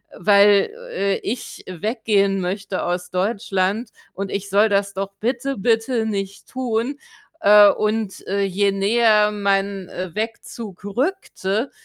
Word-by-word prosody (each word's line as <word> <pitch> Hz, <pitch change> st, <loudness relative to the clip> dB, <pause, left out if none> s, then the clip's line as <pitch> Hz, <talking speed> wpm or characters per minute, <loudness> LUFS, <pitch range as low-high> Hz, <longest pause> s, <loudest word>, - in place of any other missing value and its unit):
weil, 200 Hz, +1 st, +5 dB, 0.2 s
äh, 195 Hz, 0 st, 0 dB
ich 240 Hz, +3 st, -5 dB
weggehen 200 Hz, 0 st, 0 dB
möchte 190 Hz, +1 st, -3 dB
aus 180 Hz, 0 st, -2 dB
Deutschland 200 Hz, +2 st, -1 dB, 0.2 s
und 195 Hz, 0 st, -5 dB
ich 200 Hz, 0 st, -4 dB
soll 205 Hz, +3 st, +4 dB
das 200 Hz, -1 st, +1 dB
doch 195 Hz, +1 st, -4 dB
bitte, 255 Hz, +3 st, -2 dB
bitte 225 Hz, +2 st, +1 dB
nicht 195 Hz, -2 st, -4 dB
tun. 255 Hz, +2 st, -2 dB, 0.4 s
Äh, 205 Hz, -4 st, +8 dB
und, 215 Hz, -1 st, -1 dB
äh, 200 Hz, +1 st, 0 dB
je 195 Hz, +1 st, +1 dB
näher 210 Hz, +1 st, +3 dB
mein, 200 Hz, -2 st, -1 dB
äh, 185 Hz, -2 st, -6 dB
Wegzug 220 Hz, -2 st, -6 dB
rückte, 235 Hz, -, -2 dB
200 Hz, 125 wpm, -21 LUFS, 195-225 Hz, 0.4 s, Äh